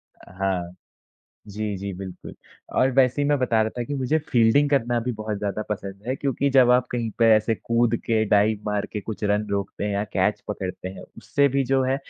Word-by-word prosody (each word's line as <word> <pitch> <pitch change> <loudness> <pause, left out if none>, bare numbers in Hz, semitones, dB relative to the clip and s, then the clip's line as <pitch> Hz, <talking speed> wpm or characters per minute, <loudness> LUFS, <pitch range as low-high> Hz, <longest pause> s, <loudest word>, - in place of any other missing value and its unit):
अ, - - -17
हाँ। 90 -2 -2 0.7
जी, 105 0 -3
जी, 100 0 -5
बिल्कुल 95 -2 -8 0.4
और 130 - +4
वैसे 130 +1 +3
ही - - +1
मैं 145 - +3
बता 120 -4 +2
रहा 110 - -1
था - - 0
कि 145 - -4
मुझे 135 +3 +1
फील्डिंग 120 +5 +4
करना 120 -4 +2
भी 125 +2 -2
बहुत 110 -1 -3
ज़्यादा 105 +1 -2
पसंद 100 -1 -5
है, 130 - 0
क्योंकि 140 0 0
जब 125 -2 +7
आप 125 0 +4
कहीं 115 -2 -2
पे 115 - +5
ऐसे 110 +1 +1
कूद 115 0 +1
के 110 -1 +2
डाइव 105 +1 +3
मार 105 -1 -1
के 105 - -3
कुछ 110 +1 -7
रन 105 +1 +1
रोकते 100 0 -3
हैं 105 - -1
या 100 +1 0
कैच 95 +3 +1
पकड़ते 95 -3 -4
हैं, 95 - -9
उससे 140 - +1
भी 140 -1 +2
जो 135 +1 +2
है 130 +1 +1
110 Hz, 220 wpm, -24 LUFS, 100-125 Hz, 0.7 s, जब